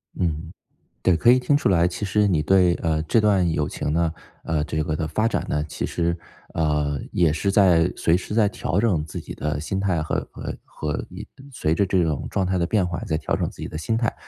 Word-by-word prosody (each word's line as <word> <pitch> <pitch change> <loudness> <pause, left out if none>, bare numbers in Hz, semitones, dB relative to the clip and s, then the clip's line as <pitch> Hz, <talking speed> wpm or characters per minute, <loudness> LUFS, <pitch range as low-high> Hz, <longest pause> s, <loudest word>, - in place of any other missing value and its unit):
嗯， 85 -1 -2 0.5
对， 90 -2 +4
可 120 +8 +5
以 125 - +6
听 140 +3 +2
出 145 - +1
来， 85 -2 +4
其 90 +4 -5
实 105 +1 +2
你 80 -5 +2
对， 90 +1 +4
呃， 80 -1 +1
这 110 +8 +3
段 100 -4 +3
友 75 -2 0
情 75 - -3
呢 85 0 +1 0.3
呃， 80 -2 0
这 80 +1 -2
个 75 - -2
的 80 0 -2
发 110 +6 0
展 115 - 0
呢， 75 0 0
其 75 - -4
实， 85 0 -1 0.4
呃， 75 -3 0
也 85 -4 +3
是 100 +6 0
在 90 -4 +4
随 85 - +3
时 95 +3 -5
在 110 -2 +4
调 95 -3 -2
整 95 -9 +1
自 75 - -7
己 - - -8
的 75 -1 -2
心 95 +5 -2
态， 90 -5 0
和 80 - -2
和 - - -6
和 75 -2 -4
一 - - -9 0.2
随 80 - 0
着 100 +4 +2
这 95 -1 +2
种 75 -4 -2
状 95 - 0
态 95 0 0
的 85 - +1
变 95 -1 +1
化， 90 -1 -4
在 80 - -1
调 - - -2
整 - - -1
自 - - -12
己 - - -3
的 80 - -6
心 110 +7 -1
态。 115 0 0
85 Hz, 255 characters per minute, -23 LUFS, 80-100 Hz, 0.5 s, 以